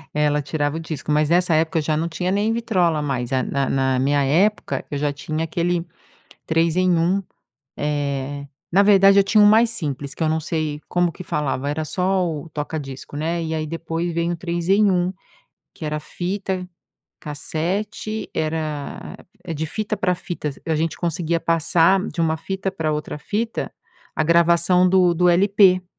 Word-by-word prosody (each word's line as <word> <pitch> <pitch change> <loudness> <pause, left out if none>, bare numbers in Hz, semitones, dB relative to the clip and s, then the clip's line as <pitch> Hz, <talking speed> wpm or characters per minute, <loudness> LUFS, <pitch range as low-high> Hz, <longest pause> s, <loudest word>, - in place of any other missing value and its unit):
É, 150 0 +2
ela 150 0 +1
tirava 145 +1 -1
o - - -3
disco, 155 -3 -5
mas 150 0 +3
nessa 175 -1 +3
época 160 +2 +1
eu - - 0
já 155 0 0
não 165 +2 -1
tinha 180 +2 -2
nem 205 +3 +1
vitrola 185 -9 +1
mais, 130 -4 -2
eh, 130 -1 +2
na 140 +1 -1
na 135 -1 +1
na 130 - +1
minha 140 +2 +2
época, 185 +10 +1
eu 145 - -2
já 145 0 0
tinha 155 +2 -4
aquele 170 +1 -1 0.6
3 165 0 +2
em 185 0 +3
1. 180 +4 +1 0.6
Eh, 140 -1 -2 0.3
na 195 +3 +5
verdade, 195 -1 +6
eu - - +5
tinha 210 +2 +4
um - - +8
mais 225 +3 +5
simples, 145 - -3
que - - -12
eu - - +2
não 160 +1 +1
sei 155 -2 -3
como 175 -1 +1
que 185 - -9
falava, 145 -4 -2
era 155 +2 -2
só 185 +2 0
o 155 0 -6
toca 150 +1 -4
disco, 135 0 -9
né. 165 +3 -1
E 160 0 -3
aí, 155 0 -2
depois 165 +2 -3
vem 170 +1 0
o - - -1
3 170 0 -4
em 200 +1 +4
1, 180 0 +1 0.6
que 175 - -11
era 150 0 -2
fita 185 +3 -4 0.5
cassete, 195 +9 -3
era 155 -2 -3 0.3
a 170 - -3
de 155 +1 -3
fita 215 +6 -3
pra 185 -2 +1
fitas, 155 -5 -5
a 160 - +1
gente 160 +1 -1
conseguia 170 -1 -1
passar 165 +3 +3
de 170 - -5
uma 160 -1 +1
fita 190 +4 -3
pra 160 -5 -2
outra 150 0 -4
fita 225 +8 -3 0.4
a - - +1
gravação 170 +2 +4
do 180 -2 +4
do 180 +1 +3
LP. 185 0 +4
165 Hz, 190 wpm, -22 LUFS, 150-185 Hz, 0.6 s, um